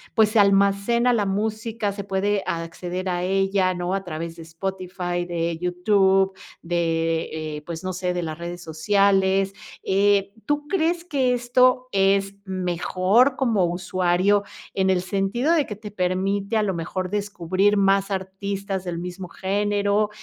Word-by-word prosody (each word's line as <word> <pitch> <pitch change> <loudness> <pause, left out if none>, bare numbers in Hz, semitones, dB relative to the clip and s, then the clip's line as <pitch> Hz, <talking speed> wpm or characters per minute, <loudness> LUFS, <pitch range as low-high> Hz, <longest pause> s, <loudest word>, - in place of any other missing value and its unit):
pues, 220 -1 +5
se 220 0 +2
almacena 200 +5 +3
la 210 -4 +1
música, 215 +1 -2
se 200 0 -6
puede 200 +1 0
acceder 175 +2 -4
a 175 -1 -1
ella, 195 0 +1
¿no?, 175 +1 -2
a 195 0 -1
través 165 -1 -5
de 170 - -11
Spotify, 175 +1 -4
de 170 -1 -1
YouTube, 190 +1 +2 0.3
de, 165 -2 -1
eh, - - -8
pues, 170 +1 -6
no 185 0 -3
sé, 180 0 -2
de 175 - -1
las 160 -1 -4
redes 175 +1 -6
sociales, 195 +3 +2 0.3
eh, 200 0 +2
¿tú 295 0 -1
crees 340 -1 0
que 270 -7 +1
esto 250 +1 +3
es 195 0 +2
mejor 185 +6 +2
como 230 -9 +2
usuario, 185 +2 +1 0.3
en 190 -1 +1
el 185 -1 +2
sentido 200 - 0
de 310 -4 +2
que 210 - -5
te 210 0 -9
permite 195 +3 0
a 215 - +2
lo 195 -2 0
mejor 180 +2 -4
descubrir 200 0 +1
más 195 0 +3
artistas 195 0 -4
del 175 -2 -3
mismo 180 +2 -6
género, 205 +2 0
195 Hz, 150 wpm, -23 LUFS, 180-205 Hz, 0.3 s, pues